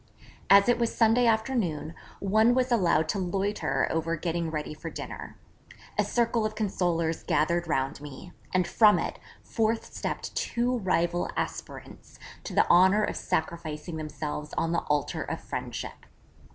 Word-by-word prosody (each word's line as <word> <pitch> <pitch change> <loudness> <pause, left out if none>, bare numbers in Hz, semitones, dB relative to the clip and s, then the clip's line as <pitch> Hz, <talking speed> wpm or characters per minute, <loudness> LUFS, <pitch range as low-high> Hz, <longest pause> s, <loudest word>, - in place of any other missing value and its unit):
As 200 +2 +7
it 245 0 +3
was 235 -1 0
Sunday 235 +1 +4
afternoon, 220 - 0 0.3
one 220 +5 +3
was 255 0 +1
allowed 175 -8 +3
to 200 - 0
loiter 195 +3 0
over 165 +1 0
getting 170 0 -2
ready 155 -1 -4
for 160 +2 -7
dinner; - - -8 0.6
a - - +2
circle 235 -1 +1
of 215 0 -2
consolers 175 -6 0
gathered 170 +3 +1
round 135 -2 -1
me, 150 +5 -10 0.2
and 185 -1 +2
from 210 +2 +5
it, - - -3 0.2
forth 225 0 -1
stepped - - -4
two 245 +1 0
rival 175 -3 0
aspirants - - -6 0.3
to - - -5
the - - +4
honour 190 +4 +5
of - - -1
sacrificing 165 -2 -3
themselves 150 -1 -5
on 165 - 0
the 170 - +1
altar 150 -1 0
of - - -4
friendship. - - -6
180 Hz, 150 wpm, -28 LUFS, 160-220 Hz, 0.6 s, As